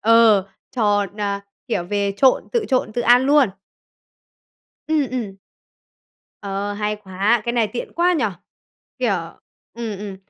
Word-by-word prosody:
ờ, 225 -3 +5 0.3
tròn 205 -3 +1
à, 200 -1 -1 0.3
kiểu, 185 -7 -1
về 200 +1 -1
trộn, 260 +3 +3
tự 465 -3 +1
trộn, 255 -4 +1
tự 240 - -1
ăn 245 +2 +6
luôn? 285 -3 +5 1.4
Ừm, 305 -4 +1
ừm. 225 -7 -4 1.1
Ờ, 200 0 -3
hay 210 +1 -2
quá! 205 +3 0
Cái 235 - -1
này 235 -2 +2
tiện 245 - -5
quá 350 +1 +2
nhỉ! 290 -9 +1 0.7
Kiểu 240 -6 +1 0.6
ừm, 225 -4 -5
ừm. 200 -1 -6
215 Hz, 140 wpm, -21 LUFS, 200-245 Hz, 1.4 s, ăn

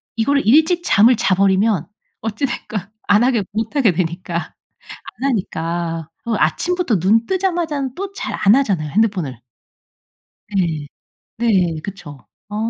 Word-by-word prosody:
이거를 280 +5 +1
일찍 315 - +4
잠을 235 -3 +5
자 190 -3 +1
버리면 195 -2 +2 0.3
어찌 225 +5 -2
됐건 220 -5 -4 0.3
안 205 +3 +5
하게 245 -4 +2
못 220 +5 -3
하게 255 -9 +4
되니까. 170 0 -3 0.7
안 275 - +2
하니까. 165 - -3 0.2
그리고 230 -2 -1
아침부터 330 - +1
눈 215 +6 +3
뜨자마자는 340 -8 -1
또 395 +4 -5
잘 395 - -5
안 200 +2 +7
하잖아요 195 - +1
핸드폰을. 180 - 0 1.1
네. 160 -6 0 0.5
네. 185 -9 +1
그쵸. 165 -9 -9 0.2
어 205 - -6
210 Hz, 270 characters per minute, -19 LUFS, 175-260 Hz, 1.1 s, 안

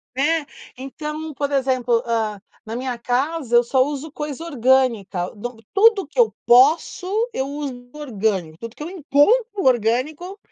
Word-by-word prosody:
Né, 295 +3 +1 0.3
então 300 +4 -6
por 285 0 -2
exemplo, 255 -3 +1
hã, 220 -3 -2 0.2
na 225 +1 -6
minha 250 0 -3
casa 250 +2 -1
eu 240 - +6
só 260 +2 +1
uso 290 +1 -5
coisa 295 0 -6
orgânica, 245 - +1
de 225 +1 -8
tudo 415 -1 +4
que 305 - -7
eu 465 -2 +4
posso 285 +8 +4 0.3
eu 265 - -1
uso 275 -4 -6
orgânico, 210 - -2
tudo 230 0 -8
que - - -8
eu 315 - -6
encontro 385 - +2
orgânico 260 - 0
265 Hz, 150 wpm, -21 LUFS, 235-305 Hz, 0.3 s, eu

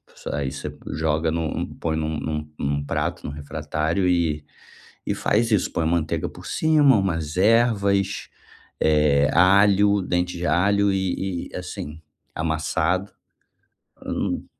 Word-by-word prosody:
S - - -12
aí 70 -2 -2
você 70 - -6 0.2
joga 80 +1 0
no 80 -2 -3
põe 80 -1 -1
num 80 0 -2
num 75 -1 -4
num 70 0 -1
prato, 70 - -3
no - - -4
refratário 75 +4 -2
e 80 -4 +1 0.6
e - - 0
faz 115 +2 +1
isso. 105 -5 +2
Põe 80 - 0
a - - 0
manteiga 80 -1 0
por - - -12
cima, 150 -5 +4
umas 80 -6 -1
ervas, 100 -2 +2 0.5
eh, 75 -2 +3
alho, 100 +3 +5
dente 90 -1 -1
de 90 - -2
alho 100 +5 +3
e 95 -1 -2
e - - -21
assim, 80 -4 -7 0.3
amassado. 80 +4 -1 0.9
Hum, - - -2
85 Hz, 135 wpm, -23 LUFS, 75-100 Hz, 0.9 s, alho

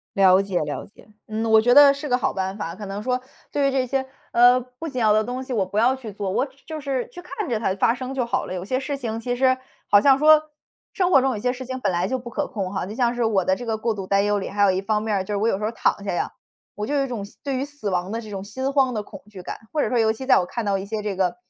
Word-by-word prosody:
了 190 -1 +6
解 195 -3 -1
了 145 -1 -4
解， 205 - -20 0.2
嗯。 220 +1 -3
我 220 0 +7
觉 245 +2 +3
得 285 -1 +9
是 280 +2 -6
个 250 - +3
好 - - 0
办 190 +1 -3
法， 165 -4 -5
可 205 +1 -8
能 195 +2 -5
说， 250 +2 0 0.3
对 280 -1 +2
于 - - +2
这 265 -1 0
些， 265 +1 -1 0.3
呃， 245 +1 +6
不 255 +6 -9
紧 255 -4 -4
要 215 -2 +4
的 215 +1 +3
东 250 +1 -4
西 260 - -6
我 210 -5 +1
不 205 +3 -3
要 245 +4 +4
去 235 -6 -8
做， 200 -1 -3
我 260 - +1 0.2
就 315 -1 -5
是 270 -3 -2
去 355 - -10
看 420 -2 -5
着 230 - 0
它 190 -4 0
发 230 +4 +2
生 255 +1 -6
就 255 -3 0
好 255 +2 -1
了。 185 - -5
有 180 - -4
些 255 +6 -1
事 280 +1 -3
情 225 -4 -4
其 245 +1 -2
实 260 0 +3 0.3
好 205 - +7
像 270 +4 +5
说， 310 0 +5 0.4
生 370 -1 +1
活 275 - +6
中 265 0 +1
有 - - -4
些 250 +4 0
事 260 +1 -7
情 260 0 -4
本 190 - 0
来 175 +2 0
就 260 - -1
不 240 -1 -9
可 - - -2
控 195 -3 -4
哈， 190 - -2
就 210 - -7
像 240 0 +1
是 240 -1 0
我 200 -4 +2
的 190 - +2
这 245 - -8
个 225 - 0
过 225 0 -1
度 195 -2 -6
担 200 +1 +2
忧 205 0 +1
里 195 - -4
还 205 +1 0
有 200 - +6
一 185 0 0
方 210 +1 0
面 215 -2 0
儿， 190 - -1
就 205 - -4
是 - - 0
我 220 +3 +1
有 195 - +1
时 210 - -4
候 215 - 0
躺 205 - 0
下 195 - -2
呀， - - -2 0.4
我 210 +1 -4
就 290 - -2
有 275 -1 +2
一 - - -4
种 225 -5 -4
死 200 - -14
对 275 -2 -2
于 265 - -1
死 290 -8 -5
亡 180 +1 -1
的 230 - -3
这 215 -2 -10
种 195 -1 -5
心 260 +6 -3
慌 265 -3 +3
的 215 - -2
恐 - - -12
惧 190 -3 -10
感， - - -6
或 300 - +1
者 - - 0
说 245 - +1
尤 220 -1 +3
其 260 +4 -8
在 270 - +6
我 180 - -1
看 235 +5 -4
到 200 -1 +1
一 190 - -5
些 215 0 -3
这 205 -1 -2
个， 190 +4 0
225 Hz, 350 characters per minute, -23 LUFS, 200-260 Hz, 0.4 s, 得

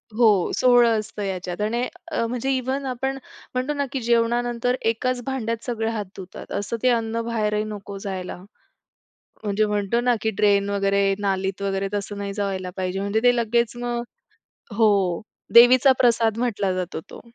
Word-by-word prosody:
हो, 215 -6 +4
सोहळं 240 -3 +5
असतं 210 -1 -6
याच्यात 185 0 -4
आणि 235 +4 0 0.2
अ, 230 - 0
म्हणजे 250 +3 -2
इव्हन 265 +2 -2
आपण 265 +1 -2 0.4
म्हणतो 255 +4 -1
ना 285 -1 -1
की 270 - -2
जेवणानंतर 240 +1 +1 0.2
एकाच 250 +2 -2
भांड्यात 230 -4 -3
सगळे 225 -2 -1
हात 210 -3 -3
धुतात. 185 -1 -10
असं 205 +3 -3
ते 255 - +5
अन्न 230 -1 0
बाहेरही 215 -2 0
नको 205 -2 -7
जायला. 190 -3 -5 1.1
म्हणजे 210 +1 +1
म्हणतो 210 +2 0
ना, 245 -1 +2
की 220 - +1
ड्रेन 200 -1 +3
वगैरे 200 0 +2
नालीत 195 0 -1
वगैरे 195 0 -1
तसं 205 0 -3
नाही 200 -1 -4
जावायला 195 -3 -3
पाहिजे. 185 +1 -2
म्हणजे 200 +2 0
ते 245 0 +5
लगेच 235 0 +1
मग 240 0 -2 0.8
हो, 200 -6 +3 0.3
देवीचा 250 +3 +8
प्रसाद 230 -2 +3
म्हटला 205 -6 0
जातो 180 -3 -3
तो. - - -11
220 Hz, 160 wpm, -23 LUFS, 200-240 Hz, 1.1 s, देवीचा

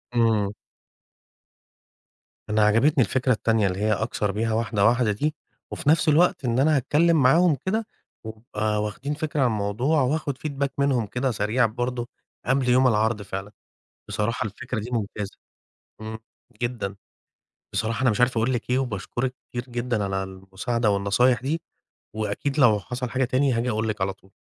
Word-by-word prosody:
إمم. 110 -4 +2 2.0
أنا 105 0 +3
عجبتني 125 +6 +4
الفكرة 130 +2 0
التانية 110 -2 +1
اللي 95 0 -3
هي 105 +1 +2
أكسَر 105 0 -1
بيها 110 +2 -1
واحدة، 110 -3 +1
واحدة 120 -1 +3
دي، 150 +10 -1 0.4
وفي 155 - -2
نَفْس 160 0 +4
الوقت 155 -2 +3
إن 120 0 +1
أنا 155 +3 +4
هاتكلم 155 +4 +3
معاهم 160 +4 +5
كده، 220 +4 0 0.4
ويبقى 110 -1 -2
واخدين 130 +8 -4
فكرة 155 0 -3
عن 130 - +4
الموضوع، 115 +8 +1
وأخد 140 +1 -1
feedback 140 -1 -2
منهم 140 -5 +2
كده 125 +5 -1
سريع 110 +3 +1
برضه 120 +2 -2 0.4
قبل 135 -1 +1
يوم 130 +1 +5
العرض 110 -1 +1
فعلًا، 95 0 -6 0.6
بصراحة 110 +3 -1
الفكرة 120 +3 -5
دي 110 +3 -6
ممتازة 105 -3 -3 0.6
إمم، 110 0 -6 0.4
جدًا، 120 -5 -2 0.8
بصراحة 115 +3 -1
أنا 130 - +4
مش 105 - -1
عارف 125 -1 +3
أقول 115 +4 +1
لِك 120 -1 -3
إيه، 125 +1 +2
وباشكرِك 125 +2 -3
كتير 120 0 -4
جدًا 120 -3 -1
على 95 -1 -1
المساعدة 95 +5 -2
والنصايح 100 +5 +2
دي، 155 +5 -2 0.6
وأكيد 110 +7 -2
لو 110 -7 +5
حصل 125 +3 -5
حاجة 130 +1 +1
تاني 130 +2 +2
هاجي 120 +1 0
أقول 110 0 -1
لِك 105 -2 -3
على 95 0 0
طُول. 95 0 -23
120 Hz, 160 wpm, -24 LUFS, 105-130 Hz, 2.0 s, معاهم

